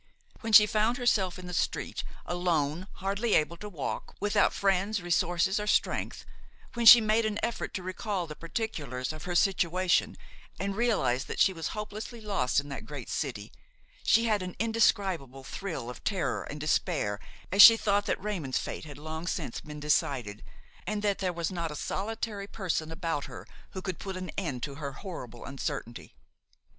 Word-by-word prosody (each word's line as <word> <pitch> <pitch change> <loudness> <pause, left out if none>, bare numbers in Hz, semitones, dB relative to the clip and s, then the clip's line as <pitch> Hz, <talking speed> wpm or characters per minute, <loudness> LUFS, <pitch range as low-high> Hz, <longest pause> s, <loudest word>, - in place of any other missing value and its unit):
When 225 - -4
she 210 0 +10
found 220 +2 +1
herself 205 -7 +1
in 185 - -9
the 180 - -6
street, - - -1 0.2
alone, 175 -1 0
hardly 200 +4 0
able 155 +2 +2
to 210 +4 -7
walk, 160 -9 -5
without 205 0 +3
friends, 200 +2 +1
resources 175 +2 +1
or 210 - -4
strength, - - 0 0.5
when 235 -1 +1
she 235 - +13
made 220 +1 +2
an 215 -1 -1
effort 235 - -2
to 185 - -3
recall 185 0 -3
the 155 -2 -8
particulars 155 - -4
of 155 - -9
her 175 -1 -3
situation 180 -1 +2 0.4
and 195 0 -2
realized 200 - +1
that - - -5
she 190 - +5
was 165 -2 -4
hopelessly 210 +2 -6
lost 185 - +1
in 145 - -5
that 140 - -7
great - - -7
city, - - -3 0.5
she 230 - +4
had 215 -3 +2
an 180 -1 -6
indescribable 190 - +1
thrill 160 -4 -5
of 125 - -8
terror 190 -5 -1
and 150 - -7
despair 150 - 0 0.3
as 200 +2 +7
she 225 +2 +12
thought 205 -1 +1
that - - 0
Raymon's 175 -11 -2
fate - - -4
had 145 -2 -10
long 160 +3 -6
since 155 -10 -3
been 150 -1 -9
decided 135 -8 0 0.5
and 210 -1 -2
that 205 -2 +1
there 185 -2 0
was 170 0 -3
not 170 -3 -2
a 150 - -6
solitary 210 +2 -3
person 165 -6 -2
about 165 -3 -2
her - - -9 0.3
who 190 -1 -6
could 185 -3 -4
put 190 -2 -5
an 185 0 -5
end 145 -11 -3
to 140 -2 -4
her 140 -2 -4
horrible 125 - -8
uncertainty. 135 -3 -5
185 Hz, 175 wpm, -29 LUFS, 150-205 Hz, 0.5 s, she